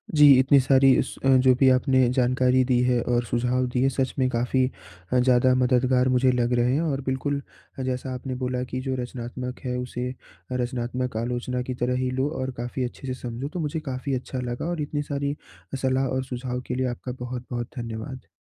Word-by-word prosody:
जी 150 -1 +7
इतनी 135 +2 +5
सारी 135 0 +5
स - - -8 0.3
जो 130 - +7
भी 135 - +6
आपने 130 0 +4
जानकारी 130 0 +3
दी 125 -1 +2
है 125 -1 +2
और 120 0 +1
सुझाव 125 +2 0
दिए 130 +2 +3
सच 135 0 -1
में 130 - +3
काफ़ी 125 +2 +1 0.5
ज़्यादा 125 0 +4
मददगार 125 0 +3
मुझे 130 0 +3
लग 125 0 +1
रहे 120 +1 +2
हैं। 145 - +1
और 145 -5 -1
बिल्कुल 140 +2 -1 0.4
जैसा 130 0 -3
आपने 130 +1 -5
बोला 125 0 -2
कि 130 - -3
जो 130 0 -2
रचनात्मक 125 +1 -6
है 125 -1 -1
उसे 125 0 -4 0.4
रचनात्मक 125 -1 -2
आलोचना 125 +2 -2
की 125 +1 -4
तरह 125 +1 +1
ही 130 - 0
लो 130 +3 0
और 130 0 -2
काफ़ी 120 +2 -3
अच्छे 125 +2 -8
से 130 - -1
समझो 120 +2 -4
तो 180 - -3
मुझे 160 0 -2
काफ़ी 130 +2 -3
अच्छा 130 +1 -4
लगा। 120 +1 -4
और 175 -3 -2
इतनी 145 0 -2
सारी 140 0 -1 0.5
सलाह 130 0 +1
और 130 0 -1
सुझाव 125 -1 -4
के 125 - -2
लिए 130 0 0
आपका 120 +1 -5
बहुत-बहुत 125 -1 -5
धन्यवाद। 115 +2 -6
125 Hz, 190 wpm, -25 LUFS, 125-130 Hz, 0.5 s, जी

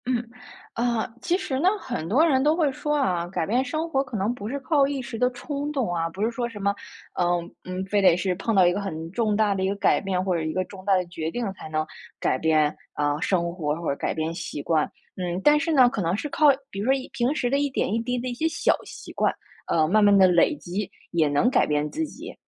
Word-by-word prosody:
嗯。 240 -2 -1 0.4
啊， 235 -1 0 0.2
其 345 +7 +1
实 275 -9 -3
呢， 350 - +2
很 240 - -4
多 265 - +4
人 270 -5 +3
都 305 +2 +3
会 315 -5 +2
说 295 +3 -2
啊， 180 -12 0
改 175 -2 -2
变 245 +7 +1
生 310 +6 -3
活 270 -4 +1
可 250 -3 -8
能 205 +3 0
不 210 -4 -7
是 270 +5 -3
靠 280 0 +3
一 280 -1 -3
时 230 -2 -7
的 250 0 +3
冲 280 +3 -4
动 255 -11 -1
啊， 165 -1 0
不 190 +5 -4
是 225 - +1
说 240 0 -2
什 230 -3 -9
么， 200 0 +1 0.5
嗯 175 -1 0
嗯， 185 +1 -4
非 205 +1 +1
得 185 -3 +6
是 180 +1 0
碰 215 +4 -1
到 190 -2 +6
一 175 - +5
个 190 - -2
很 165 -5 -5
重 215 +1 0
大 210 -1 +2
的 190 -1 -2
一 - - +1
个 200 - -1
改 200 - +3
变， 185 -2 -1
或 185 -1 0
者 170 - 0
一 155 0 -2
个 185 - 0
重 185 0 -12
大 200 -1 +4
的 185 -1 +1
决 160 -2 -4
定 230 +2 -3
才 185 - -10
能 155 0 -1 0.4
改 - - +1
变， 155 0 +2 0.2
嗯， 145 +1 0
生 170 -3 +1
活 150 -4 -2
或 170 - -4
者 - - +2
是 - - -8
改 - - -1
变 160 +1 -2
习 170 -4 -5
惯。 155 -2 +1 0.3
嗯， 180 0 -3
但 295 0 +6
是 315 +3 0
呢， 255 -4 +6
可 235 -5 -3
能 170 +1 0
是 295 +8 -4
靠， 305 +1 +3 0.2
比 195 - -7
如 205 - -2
说 265 - +4
一 270 -1 -3
平 250 +5 0
时 245 - 0
的 275 - +2
一 285 0 +1
点 255 - -1
一 225 - +1
滴 250 +2 -2
的 250 +1 -3
一 - - -3
些 315 +7 0
小 325 - +2
习 - - -10
惯， - - +1 0.4
呃， 160 -1 +3
慢 215 +4 +4
慢 205 -1 +6
地 190 - +7
累 180 - +4
积 195 -4 -4 0.2
也 165 -3 +2
能 145 +11 +2
改 260 - +3
变 150 0 0
自 320 - -1
己。 - - -9
205 Hz, 290 characters per minute, -25 LUFS, 175-255 Hz, 0.5 s, 地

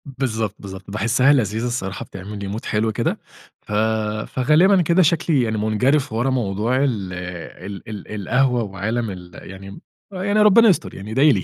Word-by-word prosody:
بالضبط، 115 -6 -3
بالضبط، 95 0 -9
باحسّها 120 +6 +3
لذيذه 110 -3 0
الصراحة 100 -6 -4
بتعمل 100 +2 -8
لي 100 0 -5
Mood - - -8
حلو 110 +1 0
كده، 105 - -1 0.4
ف - - -13 0.6
فغالبًا 165 +9 +4
كده 170 +2 +3
شكلي 155 -4 +2
يعني 110 -1 -1
مُنجَرِف 110 +6 +1
ورا 120 +4 0
موضوع 115 -1 0
ال 105 -9 -2
ال 90 +3 -8
ال 105 -3 -7
القهوة، 125 +3 +2
وعالم 110 +3 -3
ال 90 -2 -10
يعني 95 +1 -10 0.3
يعني 200 +3 0
ربنا 210 +2 +7
يستر، 185 - 0
يعني 100 +3 -8
ادعِ 130 +5 +2
لي. 150 -3 +4
110 Hz, 165 wpm, -21 LUFS, 100-135 Hz, 0.6 s, ربنا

